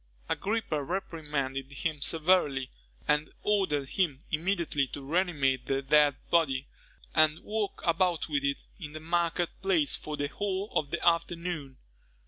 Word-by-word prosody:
Agrippa 200 -8 -1
reprimanded 140 -6 -3
him 150 +1 -3
severely, 150 -5 +3 0.4
and 150 +1 +2
ordered 170 -10 +1
him 170 -8 +1
immediately 160 -4 +1
to 135 +1 -8
reanimate 145 -6 +1
the 135 0 0
dead 145 0 +5 0.2
body, 140 -6 +3 0.5
and 155 -1 +4
walk 215 -1 -2
about 170 0 +2
with 145 -3 0
it 140 0 -1
in 150 -4 -7
the 155 - -6
market 170 +1 0
place 180 -7 +3
for 150 -1 -4
the 145 - 0
whole 200 +5 -3
of 145 - +1
the 170 +2 -1
afternoon. 170 -4 0
155 Hz, 135 wpm, -29 LUFS, 140-175 Hz, 0.5 s, dead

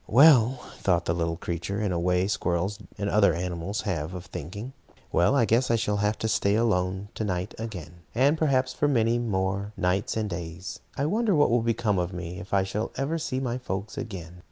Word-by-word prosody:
"Well," 130 -1 +7 0.2
thought 85 -3 +2
the 85 - +1
little 85 -1 -1
creature, 85 +3 -3
in 105 -3 0
a 85 - 0
way 90 +1 +2
squirrels 95 0 -1 0.2
and 100 - -2
other 100 0 +4
animals 90 +3 -3
have 90 -4 -3
of 90 - -7
thinking, 100 - -7 0.4
"well, 85 +11 +3
I 125 -5 +4
guess 115 +5 +2
I 115 - +4
shall 105 -2 0
have 105 +1 +1
to 110 - -1
stay 105 -2 +2
alone 95 -3 +1
to - - -3
night 95 -1 -2
again. 90 -7 -7
And 140 +5 +4
perhaps 130 -5 +1
for 145 - +1
many 120 -3 +2
more 100 -2 -1
nights 95 +5 0
and 110 -1 0
days. 85 0 -6 0.2
I 140 - +1
wonder 210 +4 +2
what 145 -4 +4
will 120 0 +3
become 115 -3 +1
of 90 +1 -2
me, 90 -1 -5
and 90 +1 -7
if 95 - -11
I 100 -1 +3
shall 100 +3 -2
ever 145 +5 -1
see 130 -4 -2
my 125 -1 -2
folks 100 -3 -4
again. 90 -5 -7
100 Hz, 210 wpm, -27 LUFS, 90-115 Hz, 0.4 s, Well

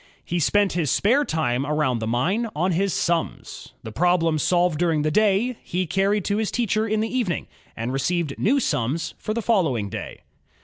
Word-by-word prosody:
He 175 - -1
spent 205 +5 +2
his 165 -5 0
spare 245 - +3
time 140 - -1
about 145 -4 0
the 110 - -3
mine 175 - 0
on 180 +5 +1
his 195 +3 +1
"sums." 170 -1 -2
The 110 - -7
problems 165 +2 +2
solved 175 -2 +2
during 165 -4 +1
the 155 - 0
day, 215 +5 +2
he 180 +1 -2
carried 195 +3 0
to 205 - 0
his 220 -1 0
teacher 220 -2 0
in 215 0 0
the 225 +3 -3
evening, 220 -9 -1 0.3
and 115 +3 -3
received 155 +2 -1
new 270 +8 +3
"sums" 140 - -1
for 215 - -3
the 230 - -2
following 155 - +1
day. - - -7
175 Hz, 185 wpm, -23 LUFS, 150-210 Hz, 0.3 s, spare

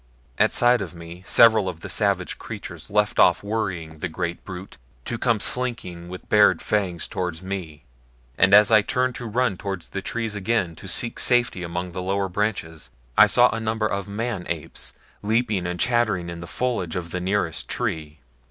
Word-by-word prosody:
At - - +4
sight 120 -1 +4
of 90 -2 -6
me 85 +1 -10
several 110 -4 +6
of 85 -3 -8
the - - -6
savage - - -1
creatures - - -8
left 105 +1 +1
off - - +5
worrying 90 -7 -3
the 90 - -3
great 85 +1 -4
brute 95 +1 -9 0.3
to 120 - -4
come 115 -4 +1
slinking 100 -9 -3
with 90 0 -9
bared 105 -1 +5
fangs 95 -6 -1
toward 90 -2 -4
me, 90 -6 -6 0.5
and 95 - +4
as 105 +1 +7
I 110 -1 +7
turned 125 +3 0
to 120 - -6
run 115 -3 0
toward 95 -3 -5
the 95 - -6
trees 115 +2 -2
again 100 -4 -1
to - - -10
seek 115 +6 +2
safety 120 -6 +4
among 90 +1 -4
the 90 +1 -5
lower 95 +1 -1
branches, 90 -6 -3 0.3
I - - +8
saw 125 0 +5
a 115 - -3
number 110 0 -1
of 100 -2 -2
the 100 - -11
man 110 -3 -3
apes 85 -3 -4 0.3
leaping 110 -4 0
and 90 0 -4
chattering 110 -8 +1
in 85 - -7
the 85 - -8
foliage 115 -5 -2
of 85 -2 -5
the 90 - -2
nearest 95 -2 -1
tree. 75 -3 -3
95 Hz, 190 wpm, -23 LUFS, 85-110 Hz, 0.5 s, I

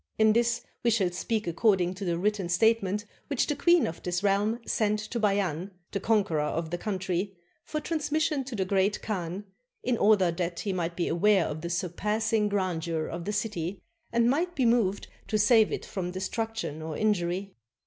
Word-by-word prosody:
In 220 0 +5
this 235 +1 +1 0.2
we 240 - +2
shall 200 -6 +2
speak 215 +4 -2
accord 190 +4 +3
ing 180 0 0
to 190 - -7
the 170 -3 0
written 200 -1 0
statement 210 +1 +2 0.2
which 280 -4 +1
the 295 - -1
queen 345 +3 +4
of 165 - -5
this 175 +1 -2
realm 205 +3 +2
sent 210 -1 +1
to 215 +3 -4
Bay 205 -2 +2
an, 180 -1 -2 0.2
the 200 - -1
conqueror 205 -6 +2
of 160 +2 -2
the 175 - -1
country, 190 -1 -2 0.3
for 305 - -3
transmission 305 -2 0
to 255 -2 -6
the 190 -3 0
Great 195 +2 +1
Khan, 190 -1 -3 0.4
in 245 -2 0
order 200 -4 +4
that 170 0 -3
he 200 -3 -2
might 170 -2 -2
be 175 - -1
aware 190 +2 +3
of 155 +1 -4
the 170 - -4
surpassing 210 +5 0
grandeur 170 -5 -1
of 170 +1 -5
the 210 - -1
city 200 -4 -2 0.3
and 235 0 +3
might 340 +8 +1
be 260 - +2
moved 225 -4 +2 0.2
to 215 - +1
save 215 +1 +5
it - - -3
from 185 -3 -4
destruction 190 -3 -3
or 155 -1 -5
injury. 195 -2 0
200 Hz, 190 wpm, -28 LUFS, 175-225 Hz, 0.4 s, In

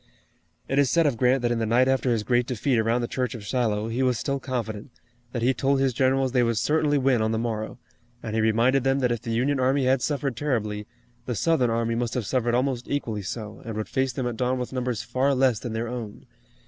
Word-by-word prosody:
It 135 - +1
is 140 -3 +4
said 170 -1 +3
of 140 -4 +2
Grant 125 +2 +2
that 120 - +1
in 120 - 0
the 115 - 0
night 125 +3 +4
after 130 -1 +1
his 115 -3 +1
great 120 +1 +1
defeat 125 0 0
around 115 +2 +1
the 120 - -2
church 125 -1 -2
of 105 -3 -8
Shiloh, 110 -2 0
he 115 +3 -2
was 125 -2 +2
still 140 +3 -2
confident, 120 -4 -4 0.4
that 120 -2 -3
he 130 +2 +3
told 135 +2 +1
his 135 -1 +2
generals 130 +1 +2
they 125 -1 +3
would 115 -2 +1
certainly 150 +4 +2
win 130 -3 +2
on 110 0 +1
the 110 - 0
morrow, 110 -2 -3 0.5
and 110 - -4
he 110 - +1
reminded 115 +4 +3
them 135 0 +2
that 125 -1 +2
if 120 -2 -2
the 120 - -7
Union 130 +5 +1
army 130 +1 +2
had 130 0 +3
suffered 140 -3 -1
terribly, 105 -7 -2 0.4
the 125 - -2
Southern 155 -3 +2
army 115 0 0
must 120 0 -2
have 125 -4 -1
suffered 120 +1 0
almost 125 -1 -1
equally 115 -7 -2
so, 105 +2 -6
and 115 -2 -6
would 110 - -3
face 130 -1 0
them 125 +1 -3
at 120 -2 -3
dawn 125 +1 0
with 125 +1 -4
numbers 125 -3 -2
far 135 +2 +1
less 130 -4 +3
than 120 - -5
their 115 +1 -2
own. 115 -3 -7
125 Hz, 245 wpm, -25 LUFS, 115-130 Hz, 0.5 s, is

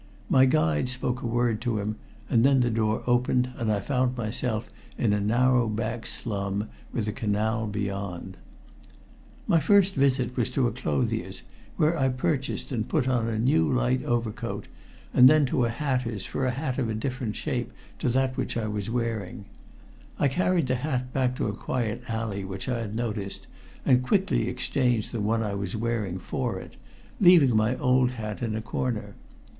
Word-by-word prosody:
My 130 0 +7
guide 80 - +2
spoke 125 0 -2
a - - -2
word 120 -1 +1
to 120 -3 -1
him, 105 +1 -2 0.3
and 115 -1 +3
then 135 -1 +5
the 120 -1 +2
door 110 -1 0
opened 125 +1 +2
and 115 -2 0
I 105 - +1
found 125 +3 0
myself 110 0 -2 0.3
in 110 -4 +2
a 105 - +1
narrow 120 +3 +3
back 110 +2 -3
slum 100 -1 -2 0.2
with 115 - -2
the 105 - -1
canal 110 +1 -1
beyond. 100 -3 -4 1.1
My 165 - +4
first 195 +4 +4
visit 130 -4 +1
was - - 0
to 130 -1 +2
a 120 - +1
clothier's, 75 -3 -2 0.3
where 155 +2 +3
I 135 -1 +3
purchased 130 +3 -2
and 115 -3 -2
put 130 - +1
on 125 -3 +1
a 110 -1 -1
new 80 - +3
light 60 +1 +1
overcoat 115 -1 -2 0.5
and 125 +1 +8
then 155 -1 +5
to 125 -1 +1
a - - 0
hatter's 125 -5 -2
for 130 - -2
a - - +2
hat 130 +1 -2
of 110 -4 -1
different 125 -3 -3
shape - - -3 0.3
to - - 0
that 130 0 0
I 110 -2 -1
was 105 -1 -3
wearing. 115 -5 -3 0.7
I 140 - +3
carried 180 +2 +1
the 130 0 0
hat 125 -2 -2
back 130 -1 +1
to 140 - -1
a - - -2
quiet 115 -3 -2
alley 110 -3 -3
which 95 0 -6
I 125 -2 -1
had 110 -2 -4
noticed, 105 -4 -3 0.4
and 125 -1 +5
quickly 190 +8 +1
exchanged 125 -5 0
the 115 - -3
one 110 +2 +1
I 105 -2 -2
was 100 -1 -3
wearing 110 -5 -1
for 90 - -3
it, - - -11 0.4
leaving 170 - +6
my 110 +4 +2
old 125 0 +3
hat 110 -3 -5
in 115 -3 -1
a 110 - -2
corner. 115 -1 -3
120 Hz, 180 wpm, -27 LUFS, 105-130 Hz, 1.1 s, and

